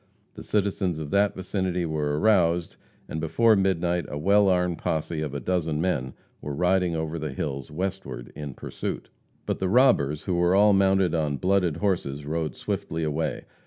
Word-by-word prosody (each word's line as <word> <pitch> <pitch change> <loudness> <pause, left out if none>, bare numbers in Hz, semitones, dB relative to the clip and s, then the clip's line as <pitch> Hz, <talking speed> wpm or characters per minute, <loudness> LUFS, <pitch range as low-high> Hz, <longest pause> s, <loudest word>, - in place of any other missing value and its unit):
The - - -10
citizens 100 -4 0
of 75 -2 -6
that 100 0 +2
vicinity 95 -2 -2
were 75 -2 -1
aroused, 85 -4 +2 0.3
and 80 - -4
before 110 +8 +4
midnight 90 -3 +1
a 75 - -5
well 100 +5 +4
armed 90 -2 +1
posse 80 0 -2
of 75 -2 -4
a - - -2
dozen 80 +1 -1
men 70 -7 -1 0.3
were 75 -1 -5
riding 90 0 +2
over 80 +1 -3
the 75 0 -3
hills 70 0 -4
westward 80 -8 -5
in 70 -3 -6
pursuit. - - -6 0.3
But - - -2
the 95 - 0
robbers, 95 - +3
who 95 - -2
were 85 +1 +3
all 105 +1 +6
mounted 95 -3 +3
on 75 -3 0
blooded 90 -3 +1
horses, 80 -8 -1
rode 80 -2 -2
swiftly 80 0 -3
away. 80 +1 -2
85 Hz, 170 wpm, -26 LUFS, 75-95 Hz, 0.3 s, all